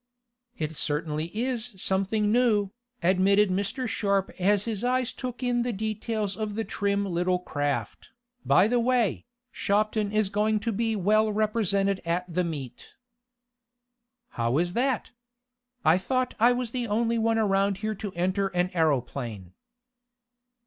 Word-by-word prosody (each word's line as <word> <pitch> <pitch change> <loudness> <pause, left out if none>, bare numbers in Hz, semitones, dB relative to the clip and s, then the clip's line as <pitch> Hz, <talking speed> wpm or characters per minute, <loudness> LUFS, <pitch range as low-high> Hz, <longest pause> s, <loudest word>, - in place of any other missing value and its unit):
"It 155 0 -3
certainly 150 +1 -1
is 235 +1 -3
something 195 +3 0
new," 215 -5 +3 0.3
admitted 195 +3 +4
Mr. 200 +7 -2
Sharp 200 -3 0
as 200 +2 +2
his 225 -2 -3
eyes 250 0 0
took 250 -1 -6
in 245 -1 +1
the 245 +1 -1
details 215 -1 -2
of 215 -1 -4
the 225 - -1
trim 200 -1 -1
little 180 0 +1
craft. 145 -5 -3 0.3
"By 200 - +5
the 245 +2 +2
way, 240 -3 +1 0.3
Shopton 210 0 0
is 215 -2 +1
going 215 +1 +1
to 230 +1 -1
be 225 +1 0
well 215 +2 +3
represented 205 -2 +1
at 170 +2 -1
the 180 +2 +1
meet." 145 -7 -7 1.3
"How 120 +3 0
is 175 +2 0
that? 255 +2 0 0.7
I 160 +4 +5
thought 255 +5 -1
I 235 +3 +6
was 245 -2 -2
the 245 -1 -2
only 230 +2 +1
one 225 0 +2
around 195 -2 +2
here 215 - 0
to 205 -1 -6
enter 185 +3 0
an 180 +1 +1
aeroplane." 125 - -1
205 Hz, 140 wpm, -27 LUFS, 180-225 Hz, 1.3 s, I